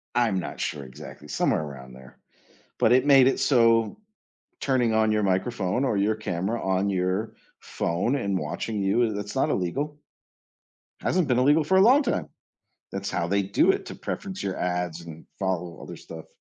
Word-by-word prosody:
I'm 110 -6 +2
not - - -6
sure 75 -2 -3
exactly, 65 +3 -11
somewhere 75 - 0
around 65 -4 -9
there, 65 0 -15 0.6
but 110 - +3
it 130 +2 +4
made 135 -2 +7
it 135 - +1
so, 115 - +3 0.6
turning 125 -4 +1
on 110 -1 +3
your 105 0 +1
microphone, 95 +4 0
or 110 -6 0
your 105 +2 +2
camera 105 +2 -2
on 95 +1 0
your 95 +4 -1 0.3
phone, 90 +10 -1
and 100 -7 -1
watching 100 +8 -4
you, 105 +1 +1
it's 105 0 -6
not - - +2
illegal. 145 - -2 1.0
Hasn't 180 -4 +1
been 125 0 +3
illegal 145 +4 +4
for 190 +5 +2
a - - +6
long 265 +7 +6
time, 245 - -1 0.7
that's - - -4
how 85 - -1
they 100 +2 +1
do 100 +1 +3
it, - - -4
to - - -7
preference 190 -2 -5
your 95 -1 -3
ads, 90 -2 -2
and 80 -1 -11
follow 90 -4 -3
other - - -8
stuff. 80 -1 -10
100 Hz, 175 wpm, -25 LUFS, 90-125 Hz, 1.0 s, made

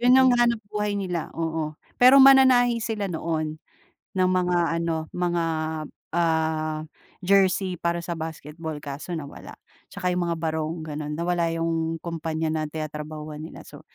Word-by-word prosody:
'yon 250 +1 +6
ang 260 - +6
hanapbuhay 215 -3 0
nila, 180 -4 -3
oo. 160 -2 -2 0.2
Pero 255 +3 +8
mananahi 260 -3 +7
sila 215 -3 -2
noon 160 -2 -2 0.6
ng 185 -1 +2
mga 180 -1 +2 0.2
ano 165 -1 -2
mga, 175 -1 0 0.7
ah, 160 -2 0 0.4
jersey 190 -1 +3
para 170 +1 -1
sa 170 - -2
basketball. 160 -1 -6
Kaso 145 +4 -6
nawala, 145 -3 -9 0.3
'tsaka 180 0 -2
'yong 180 0 0
mga 170 - -1
barong 160 0 -2
gano'n. 150 -1 -4
Nawala 170 0 0
'yong 165 0 -1
kumpanya 160 -1 -3
na 155 -1 -2
tinatrabahuhan 155 0 -6
nila. 160 - -10
So - - -12
165 Hz, 140 wpm, -25 LUFS, 155-185 Hz, 0.7 s, Pero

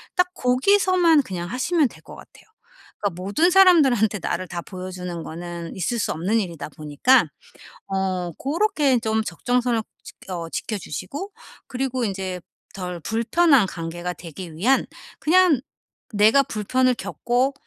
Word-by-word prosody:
딱 360 0 +3
거기서만 335 +4 +3
그냥 175 -6 -5
하시면 290 - +1
될 - - -16
것 - - -12
같아요. - - -16 0.6
그러니까 185 -3 -3
모든 305 - +2
사람들한테 280 - +5
나를 185 +2 -3
다 175 -1 -4
보여주는 180 -2 -7
거는 170 0 -7
있을 210 +6 -2
수 - - -1
없는 190 +8 0
일이다 170 -7 -5
보니까 155 - +2 0.6
어 190 -2 -1
고렇게 300 - +1
좀 220 -1 0
적정선을 240 +5 0 0.2
지 - - -11 0.2
어 170 -3 -4
지켜 215 +5 -3
주시고 205 - -6 0.4
그리고 255 -1 -2
인제 190 -3 -3 0.3
'덜 180 -2 -5
불편한 240 - +3
관계가 175 +1 -5
되기 170 0 -9
위한 245 +11 +2 0.3
그냥 350 -3 +4 0.5
내가 215 +7 +5
불편을 255 +3 +1
겪고 245 +4 -1
220 Hz, 295 characters per minute, -23 LUFS, 180-270 Hz, 0.6 s, 사람들한테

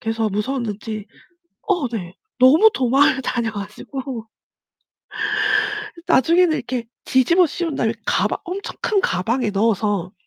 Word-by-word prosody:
그래서 225 -1 -1
무서웠는지 215 -1 -3 0.6
어 355 - +1
네 180 -7 -5 0.3
너무 305 +12 +7
도망을 270 - +3
다녀 235 -2 -1
가지고 225 +4 -7 1.8
나중에는 335 +4 +4
이렇게 250 -5 -4 0.2
뒤집어 335 +8 +4
씌운 330 -1 -3
다음에 225 -4 0
가방 210 +3 +1
엄청 375 +3 -5
큰 410 -3 +1
가방에 225 - 0
넣어서 205 -3 0
240 Hz, 270 characters per minute, -21 LUFS, 215-285 Hz, 1.8 s, 너무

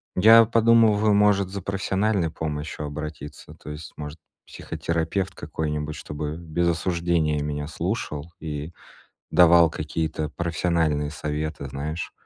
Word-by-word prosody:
Я 115 +4 +8
подумываю, 110 -2 +4
может, 100 -2 +3
за 100 +1 -5
профессиональной 95 -1 0
помощью 75 -1 -4
обратиться. 75 0 -7
То - - -12
есть, 75 +1 -8
может, 75 +1 -7 0.3
психотерапевт 85 +3 -3
какой-нибудь, 75 0 -3
чтобы 75 +1 -5
без 85 +1 -1
осуждения 85 -3 0
меня 75 0 -3
слушал 85 -3 -4
и 75 0 -5 0.6
давал 85 -1 +6
какие-то 80 0 -3
профессиональные 80 -3 0
советы, 75 -1 -4
знаешь. 75 +4 -4
80 Hz, 115 wpm, -24 LUFS, 75-90 Hz, 0.6 s, Я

